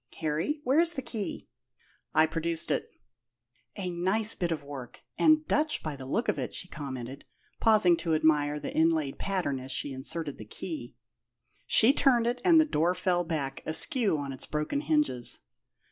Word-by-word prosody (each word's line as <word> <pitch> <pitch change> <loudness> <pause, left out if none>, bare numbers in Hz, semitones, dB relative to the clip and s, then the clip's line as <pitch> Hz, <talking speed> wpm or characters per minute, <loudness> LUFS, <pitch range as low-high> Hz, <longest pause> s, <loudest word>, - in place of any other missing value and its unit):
Harry, 160 - -1
where's 325 +7 +3
the 270 - -3
key?" 220 -5 -5 0.6
I 155 - +5
produced 165 +1 -2
it. - - -1 0.9
"A 185 -3 -3
nice 190 +6 +2
bit 175 -2 -2
of 155 -3 -2
work 140 -3 -9 0.2
and 310 0 +5
Dutch, 305 +1 0
by 155 -2 -4
the 130 -1 -9
look 225 - -1
of - - 0
it," - - -4
she 180 - -5
commented, 135 -4 -7 0.4
pausing 210 -6 +5
to 165 -1 0
admire 150 -1 +2
the - - -5
inlaid 160 -3 +1
pattern 180 -9 -1
as 130 +1 -8
she 140 - -3
inserted 145 +3 -5
the 110 - -8
key. 120 - -7 0.7
She 235 +5 +7
turned 250 -5 +3
it, 245 +1 -1
and 335 -3 +6
the 315 - +5
door 175 - +1
fell 175 -1 +1
back, 145 -5 -3
askew 210 - +1
on 140 -2 -4
its 130 - -9
broken 150 - -2
hinges. 300 - 0
165 Hz, 170 wpm, -29 LUFS, 145-225 Hz, 0.9 s, She